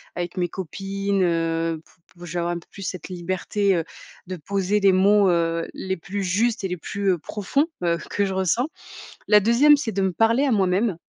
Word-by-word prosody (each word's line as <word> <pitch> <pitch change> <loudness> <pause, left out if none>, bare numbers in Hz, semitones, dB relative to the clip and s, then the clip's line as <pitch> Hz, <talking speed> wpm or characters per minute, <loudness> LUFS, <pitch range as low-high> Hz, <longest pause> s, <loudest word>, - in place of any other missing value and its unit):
avec 175 0 -4
mes 175 -1 0
copines, 195 +2 -2
heu, 165 -1 0
p - - -25 0.3
p 175 - -9
je 165 - -7
vais 175 - -1
avoir 175 0 -1
un 175 - -4
peu - - -21
plus 195 - -9
cette 185 -1 -5
liberté, 185 +3 -1
heu, 165 -2 -1 0.4
de 185 - -4
poser 195 +4 -1
les 195 -1 +5
mots, 195 +1 +4
heu, 165 -1 0
les 190 0 -4
plus 195 +4 -5
justes 215 +4 0
et - - 0
les 180 -1 -4
plus, 200 +4 -2
heu, - - -2
profonds, 210 - -1 0.2
heu, 170 -1 +2
que 205 - +1
je 190 - -3
ressens. 190 - +1 0.6
La 210 -1 +6
2e, 245 +8 +6
c'est 275 -6 -3
de 195 - -1
me 190 -2 0
parler 230 +7 +3
à 275 - +1
moi-même 195 0 +2
190 Hz, 215 wpm, -23 LUFS, 175-205 Hz, 0.6 s, La